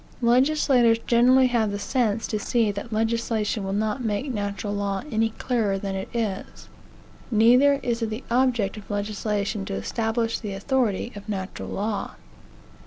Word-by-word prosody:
Legislators 250 -1 +4
generally 250 +2 +5
have 235 -4 +1
the 200 - -3
sense 225 0 0
to 215 - -2
see 225 0 +1
that 200 +3 -7
legislation 225 -1 0
will 195 - -3
not 215 +5 -1
make 225 +5 -2
natural 205 -1 -3
law 200 -1 -2
any 225 0 +2
clearer 220 -3 -1
than 195 0 -4
it 190 0 -4
is. 220 -5 -4 0.6
Neither 245 +5 +5
is 235 -2 -1
it 225 - 0
the 220 +4 -5
object 240 -5 +1
of 205 - -11
legislation 205 0 -2
to - - -4
establish 225 - -1
the 210 -3 -5
authority 235 +1 0
of 205 +1 -10
natural 190 -2 -4
law. 205 -1 -3
220 Hz, 155 wpm, -25 LUFS, 205-240 Hz, 0.6 s, generally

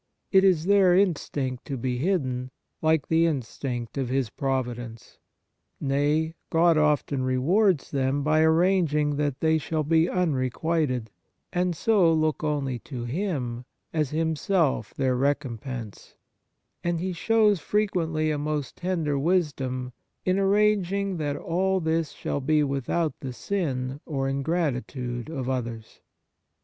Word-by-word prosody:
It 190 -1 +6
is 180 -5 +3
their 195 -2 +5
instinct 145 -9 0
to 140 -3 -4
be 125 0 -2
hidden, 130 -7 -1 0.3
like 160 -2 +2
the 165 +1 +3
instinct 125 -3 -3
of 130 -3 -2
His 130 -4 0
providence. 120 -4 -4 0.6
Nay, 145 +3 +1 0.2
God 165 0 +4
often 150 -3 +2
rewards 150 +8 +2
them 135 0 0
by 155 +1 +3
arranging 160 -3 +3
that 145 -3 -1
they 160 0 +3
shall 155 0 -2
be 160 +3 +3
unrequited, 140 - 0 0.4
and 180 -1 0
so 195 -5 +4
look 155 -1 +1
only 140 -5 -1
to 125 0 -7
Him 125 -5 -3 0.3
as 155 -4 0
Himself 160 +1 0
their 130 -2 +1
recompense; 130 -4 -3 0.7
and 175 -1 0
He 185 +1 -2
shows 210 +1 +3
frequently 165 -5 0
a 150 - -1
most 150 -1 -3
tender 165 -6 -1
wisdom 135 -7 -1 0.3
in 185 +1 +2
arranging 200 -1 +2
that 145 -2 -2
all 190 +3 0
this 160 -2 0
shall 145 - -3
be 150 +2 +2
without 140 +4 -1
the 130 -2 -5
sin 130 - -2
or 135 -3 -1
ingratitude 135 -4 -2
of 135 -6 -4
others. 120 -4 -4
150 Hz, 130 wpm, -26 LUFS, 130-170 Hz, 0.7 s, It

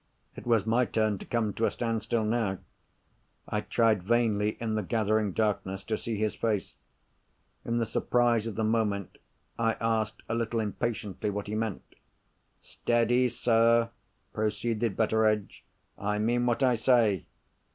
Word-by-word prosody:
It - - -10
was 115 -4 +3
my 115 +3 +3
turn 110 -3 0
to - - -10
come 110 -4 0
to 115 - 0
a - - +3
standstill 115 -1 -1
now. 105 -3 0 0.9
I - - -1
tried 110 -4 +2
vainly, 105 0 +1
in 115 -2 -2
the 110 - 0
gathering 110 0 +1
darkness, 95 -2 -1
to 110 - -1
see 110 0 -4
his 110 0 0
face. 110 -4 -2 0.9
In 120 0 -1
the 115 - +1
surprise 120 0 +1
of 110 - -5
the 110 - -1
moment, 110 -3 -1 0.4
I 115 -1 +2
asked 110 -2 -1
a - - -2
little 115 0 -1
impatiently 105 -1 -2
what 105 0 -3
he 105 - -5
meant. 110 -3 -2 0.8
"Steady, 120 +2 +1
sir!" 115 0 +3 0.4
proceeded 110 0 -1
Betteredge. 110 -2 +1 0.4
"I 105 +1 -1
mean 120 +3 +1
what 120 +3 +1
I 125 -2 +3
say. 110 -6 +3
110 Hz, 150 wpm, -29 LUFS, 105-115 Hz, 0.9 s, was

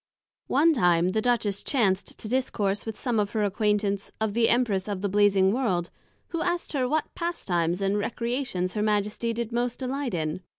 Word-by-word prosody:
One 320 +5 +4
time 175 - +3
the 220 +4 0
Duchess 215 -4 +1
chanced 200 -8 0
to - - -6
discourse 215 -5 -1
with 220 - -4
some 240 -4 0
of 205 -1 -1
her 215 -2 +1
acquaintance, 205 0 0
of 220 -2 -1
the 230 +1 +3
Empress 220 -6 +1
of 200 -3 -3
the 200 - 0
Blazing 195 -1 +4
world, 190 -9 0 0.4
who 335 -1 -3
asked 350 -1 -2
her 255 -3 0
what 310 +2 -1
Pastimes 180 - -1
and 195 +1 +1
Recreations 235 -5 -2
her 210 - -1
Majesty 210 +2 0
did 235 0 -3
most 240 +1 -1
delight 265 -4 -3
in? 160 +2 -2
210 Hz, 180 wpm, -26 LUFS, 195-245 Hz, 0.4 s, One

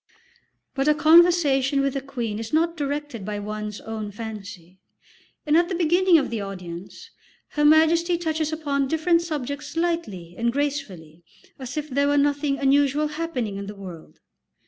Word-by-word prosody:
But 270 +1 -1
a 300 - +5
conversation 310 -4 +4
with 275 -1 -1
a 275 - -1
queen 240 -6 -4
is 225 0 -6
not 330 +2 +1
directed 290 - -4
by 210 +1 -4
one's 210 0 -5
own 220 -2 -5
fancy, 200 -4 -9 0.7
and 300 0 +2
at 345 +1 +3
the 370 - -2
beginning 350 +1 +4
of 280 - -1
the 225 -3 -2
audience 190 - -8 0.4
Her 295 - -1
Majesty 325 +3 +4
touches 315 -2 -2
upon 285 -3 -1
different 330 +3 +2
subjects 295 -2 -5
lightly 330 - -2
and 235 0 +1
gracefully 225 - -4 0.4
as 260 +2 -7
if 300 0 -2
there 280 0 +1
were 290 0 +2
nothing 285 0 +1
unusual 285 +2 +2
happening 300 -10 -3
in 200 0 -6
the 205 - -7
world. 180 -5 -11
280 Hz, 160 wpm, -24 LUFS, 215-315 Hz, 0.7 s, a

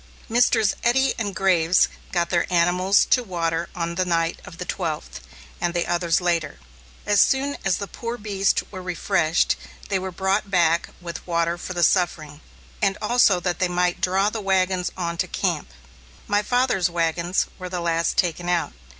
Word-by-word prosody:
Messrs. 225 -3 +3
Eddy 265 +3 +3
and 205 -4 -3
Graves 180 -2 +3 0.2
got 170 -1 0
their 175 +1 0
animals 180 +3 +3
to 250 - +5
water 170 -4 -2
on 170 -1 -2
the 185 +2 0
night 165 -2 0
of 165 - -11
the 180 - -5
twelfth, 155 - -4 0.4
and 175 0 -1
the 175 - +1
others 175 -1 +1
later. 170 -5 -1 0.5
As 205 0 +4
soon 280 +1 +2
as 190 -2 +1
the 200 - -4
poor 235 +4 -6
beasts 200 -2 0
were 190 -2 -7
refreshed, 180 -2 +1 0.3
they 195 -2 +1
were 190 0 -4
brought 190 +3 -1
back 170 -3 +2
with 170 0 -7
water 170 0 0
for 180 +1 -6
the 175 - +1
suffering, 155 -4 +1 0.4
and 195 -1 +1
also 215 -4 +3
that 180 0 -2
they 185 - +2
might 180 0 0
draw 190 +3 +2
the 220 - -4
wagons 185 -2 +1
on 170 -2 -3
to - - -1
camp. - - -2 0.6
My 205 0 +1
father's 245 -6 +1
wagons 170 +1 0
were 185 0 -6
the 180 -1 -3
last 170 -1 0
taken 175 0 0
out. 175 -2 0
180 Hz, 175 wpm, -23 LUFS, 170-195 Hz, 0.6 s, to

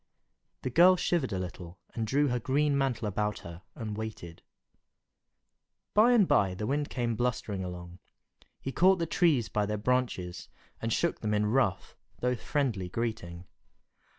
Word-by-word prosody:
The 130 - -2
girl 180 +7 +7
shivered 170 -7 0
a 95 - -1
little, 90 -1 -7 0.2
and 110 -1 -2
drew 145 +4 +2
her 125 0 0
green 140 +4 +1
mantle 130 -5 0
about 105 +1 -2
her 85 +1 -9
and 110 -3 -5
waited. 105 -6 -7 1.5
By 225 +4 +6
and 210 -6 +5
by 95 -2 +3
the 105 +3 -4
Wind 145 +4 -1
came 120 -2 -1
blustering 110 -4 -2
along. 90 0 -8 0.6
He 135 - -4
caught 185 +6 +4
the 170 - -1
trees 155 - +2
by 105 -1 -1
their 105 0 -1
branches, 105 -6 -1 0.3
and 115 - -2
shook 170 +8 0
them 105 -1 0
in 105 0 +2
rough, 110 -2 0 0.2
though 125 0 +1
friendly 115 -8 -1
greeting. 90 -6 -4
115 Hz, 155 wpm, -29 LUFS, 100-135 Hz, 1.5 s, girl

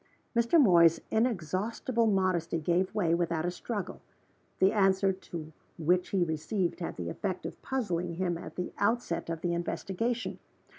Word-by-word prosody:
Mr. 235 +8 +4
Moy's 170 - +6
inexhaustible 225 +2 0
modesty 185 -5 +1
gave 180 +5 0
way, 175 -6 +2
without 170 -1 0
a 175 - 0
struggle. 205 +3 -5 0.6
The 190 +2 +4
answer 195 -2 +3 0.6
which 180 +3 +2
he 190 -3 +2
received 170 +4 -1
had 170 - -4
the 85 -1 -4
effect 185 - -3
of - - -7
puzzling 180 -10 -2
him 175 -1 0
at 165 - -8
the 180 - -4
outset 205 -6 0
of 165 -1 -3
the 175 -1 0
investigation. 195 +7 -2
185 Hz, 145 wpm, -30 LUFS, 170-210 Hz, 0.6 s, Moy's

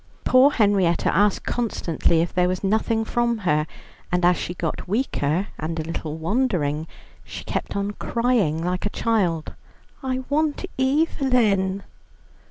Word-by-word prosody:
Poor 255 +2 +6
Henrietta 200 - +2
asked 205 +2 +3
constantly 170 -8 0
if 170 - -2
there 180 -1 +2
was 185 +1 -2
nothing 220 +2 +1
from 240 0 0
her, 150 -7 +1 0.4
and 180 0 +2
as 180 0 +5
she 175 - -4
got 165 -2 -4
weaker, 185 - 0
and 160 +1 -3
a - - -2
little 160 -1 -5
wandering, 160 - 0 0.4
she - - -8
kept - - -4
on 200 0 -1
crying 210 -9 0
like 180 +1 -2
a - - -2
child: 185 -9 0 0.5
"I 260 -1 -2
want 305 +4 0
Evelyn." 250 -9 +2
200 Hz, 140 wpm, -23 LUFS, 170-240 Hz, 0.5 s, Poor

